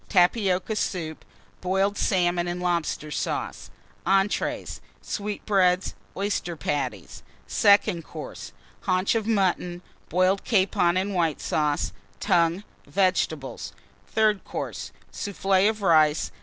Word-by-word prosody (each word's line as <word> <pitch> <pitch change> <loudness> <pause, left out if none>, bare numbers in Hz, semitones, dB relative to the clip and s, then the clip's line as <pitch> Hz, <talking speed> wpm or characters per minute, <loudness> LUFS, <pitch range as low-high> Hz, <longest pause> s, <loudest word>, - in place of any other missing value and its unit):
Tapioca 190 +1 +2
Soup. 165 -6 -3 0.4
Boiled 190 +2 +1
Salmon 175 -3 +1
and 175 0 -3
Lobster 170 -4 -1
Sauce. - - -3 0.4
ENTREES. 195 +2 0 0.2
Sweetbreads. 195 -3 0 0.2
Oyster 195 -3 -1
Patties. 130 - -3 0.2
SECOND 200 -4 +4
COURSE. - - -8 0.4
Haunch 185 +1 +2
of 225 -2 -1
Mutton. 180 -4 0 0.3
Boiled 185 +3 +2
Capon 185 -4 +2
and 195 +2 -1
White 165 -4 +1
Sauce. 150 -2 0 0.3
Tongue. 170 +3 +2 0.2
Vegetables. 180 -7 0 0.3
THIRD 215 -2 +2
COURSE. - - -5 0.2
Soufflé 195 0 +2
of 215 -2 -4
Rice. 155 -4 +4
185 Hz, 100 wpm, -25 LUFS, 170-200 Hz, 0.4 s, SECOND